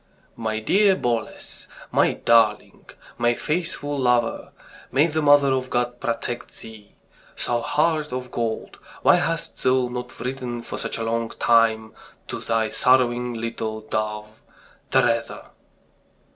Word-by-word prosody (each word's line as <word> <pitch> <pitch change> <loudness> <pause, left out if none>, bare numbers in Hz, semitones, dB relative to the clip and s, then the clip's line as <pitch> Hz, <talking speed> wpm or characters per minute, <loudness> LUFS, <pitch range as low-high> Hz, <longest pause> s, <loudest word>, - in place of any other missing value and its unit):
"My 110 -1 -2
dear 195 - +3
Boles... 120 - -4 0.2
my - - +3
darling... 110 -2 +2 0.3
my 120 0 +2
faithful 150 -2 -2
lover. 125 -2 +1 0.4
May 140 +4 +4
the 160 -1 -1
Mother 145 -2 +5
of 130 -1 -2
God 120 0 -1
protect 120 +1 -4
thee! 110 -2 -13 0.5
Thou 120 -1 0
heart 155 +1 0
of 125 0 -5
gold, 115 -2 -3 0.2
why - - +6
hast - - -3
thou 130 -1 +2
not 125 0 -7
written 125 -2 -4
for - - -6
such - - -4
a 115 - -3
long 115 0 -1
time 115 -1 +3 0.4
to - - -4
thy 115 -1 -1
sorrowing 125 -1 +2
little 110 -1 -4
dove, 110 0 -4 0.5
Teresa?" 115 -3 0
120 Hz, 130 wpm, -23 LUFS, 115-130 Hz, 0.5 s, why